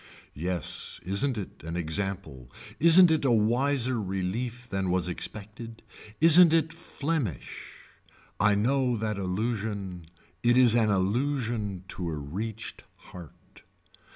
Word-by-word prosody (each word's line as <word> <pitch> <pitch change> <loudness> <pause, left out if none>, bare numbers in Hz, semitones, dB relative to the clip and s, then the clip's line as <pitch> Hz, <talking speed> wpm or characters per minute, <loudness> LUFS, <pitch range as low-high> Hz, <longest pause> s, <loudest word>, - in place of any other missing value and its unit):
Yes 85 +1 -3
isn't 110 +8 0
it 100 - -8
an 80 +1 -6
example 80 -7 -4 0.3
isn't 170 +2 +8
it 160 -2 +1
a 135 - +2
wiser 120 +2 +1
relief 105 +6 -4
than 95 -4 -2
was 90 -1 0
expected. 110 +5 -7 0.4
Isn't 165 +1 +7
it 165 0 0
Flemish. 150 - -5 0.6
I 105 0 +3
know 125 +3 +1
that 105 -2 -3
allusion 100 -3 -4 0.3
it 120 +1 +3
is 125 -3 +6
an 115 -2 +2
allusion 105 -1 -1
to 90 -2 -4
a 80 - -4
reached 105 +10 -6
heart. 85 -4 -15
110 Hz, 120 wpm, -27 LUFS, 95-125 Hz, 0.6 s, isn't